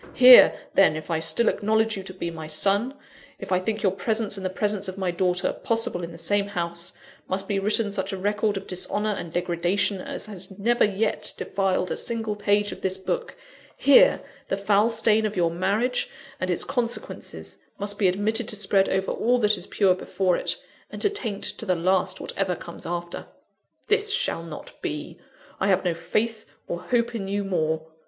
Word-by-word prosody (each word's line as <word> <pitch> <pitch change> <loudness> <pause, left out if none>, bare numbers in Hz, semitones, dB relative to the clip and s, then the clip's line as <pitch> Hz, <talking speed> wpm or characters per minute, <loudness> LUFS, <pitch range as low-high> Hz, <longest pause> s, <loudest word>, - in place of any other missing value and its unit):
Here, 255 0 +9 0.2
then, 195 -5 +5
if 155 +2 -6
I 160 - +1
still 230 +8 +1
acknowledge 220 +1 +1
you 195 - -5
to 185 - -7
be 170 -2 -4
my 160 -1 -7
son; 200 - +1 0.4
if - - -9
I 185 - +3
think 210 +3 -3
your 195 - +3
presence 215 +1 -2
and 195 - -6
the 185 - -1
presence 205 +1 -2
of 185 0 -6
my 190 -2 -1
daughter 180 0 0
possible 230 -5 -1
in 170 - -5
the 165 - -10
same 200 +3 0
house, 170 -3 -4 0.4
must 195 +1 -3
be 200 -2 0
written 210 +1 +2
such 190 -1 -2
a 195 - -4
record 205 +1 0
of 195 - -6
dishonour 205 +3 -2
and 170 -5 -5
degradation 180 +3 0
as - - -5
has 195 -2 -6
never 235 +4 +2
yet 205 +2 0
defiled 190 -2 -1
a - - -1
single 225 -3 -2
page 205 0 +1
of - - -9
this 190 0 -1
book 465 - -3 0.4
here, - - +6 0.2
the 195 - -1
foul 205 +2 +3
stain 220 -1 +2
of 210 - -6
your 170 -2 +2
marriage, 200 +8 0 0.3
and 185 - -2
its 175 - 0
consequences, 240 -2 -5 0.2
must 205 0 -4
be 200 - +4
admitted 210 +5 +1
to - - 0
spread 195 -1 +3
over 190 0 0
all 245 +2 +2
that 210 -3 +3
is 180 -1 -6
pure 195 -3 +3
before 185 0 0
it, - - -1 0.3
and - - -8
to 415 - +3
taint 225 - -3
to - - -4
the 185 -4 +1
last 185 +2 +1
whatever 190 -2 -2
comes 170 - -9
after. 175 0 -5 0.6
This 430 0 +2
shall 165 - +1
not 165 -2 -10
be. 150 +3 -5 0.4
I 190 - +1
have 190 -1 +2
no 175 - +2
faith 215 +7 -2 0.2
or 175 - -3
hope 235 +4 0
in 205 -4 -4
you 200 +1 -1
more. 160 -4 -1
195 Hz, 195 wpm, -25 LUFS, 180-215 Hz, 0.6 s, Here